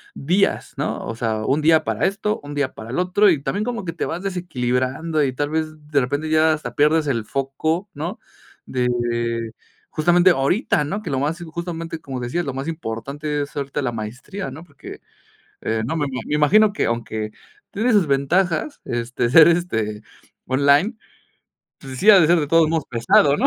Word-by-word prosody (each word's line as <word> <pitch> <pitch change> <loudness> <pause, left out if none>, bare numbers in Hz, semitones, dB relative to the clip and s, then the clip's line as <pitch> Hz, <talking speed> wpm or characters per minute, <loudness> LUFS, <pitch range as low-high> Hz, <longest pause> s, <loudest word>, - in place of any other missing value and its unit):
días, 180 +8 0
¿no?, - - -3
o 115 - -5
sea, 110 -2 -2
un 145 +3 +1
día 160 +1 +4
para 110 +5 0
esto, 205 +2 -2
un 145 0 -8
día 140 -2 -1
para 110 +1 -10
el 125 - -3
otro 185 +3 +3
y 155 -5 +2
también 200 +10 -1
como 235 -4 -4
que 165 - -4
te - - -3
vas 175 +4 -4
desequilibrando 155 -3 -1
y 135 - +1
tal 145 +3 -2
vez 160 0 0 0.2
de 145 -2 +2
repente 145 +5 -2
ya 155 0 +4
hasta 155 - -5
pierdes 150 +1 +3
el 120 -6 -1
foco, 155 - -2
¿no?, 170 +8 -5 0.5
de 120 -2 -1 0.4
justamente 175 +3 +4
ahorita, 150 - +1
¿no?, 200 +9 -4
que - - -4
lo 135 - 0
más, 150 +4 -1
justamente, 165 0 -5
como 135 -5 -6
decías, 150 +9 -2
lo 135 -3 -4
más 135 +3 -4
importante 145 +1 -4
es 140 - -10
ahorita 140 0 -3
la 120 - -1
maestría, 120 - -6
¿no?, 145 +5 -10
porque, 175 - -11 0.6
eh, 110 0 -1
no 150 +7 -2
me 150 -2 0
ma 130 -1 -4
me - - -2
imagino 200 +8 +4
que - - 0
aunque 110 -2 -3 0.4
tiene 230 +5 +1
sus 195 -7 +4
ventajas, 165 - 0
este, 120 0 -2
ser, 160 +4 +8
este, 110 -12 0 0.4
online, 140 - +3 0.8
pues 130 -2 -9
sí 215 - +7
ha 195 -3 +8
de 155 - +5
ser 175 0 +5
de 150 - 0
todos 165 +1 +4
modos 160 -2 0
pesado, 130 +4 +3
¿no? - - +2
150 Hz, 190 wpm, -21 LUFS, 130-170 Hz, 0.8 s, ser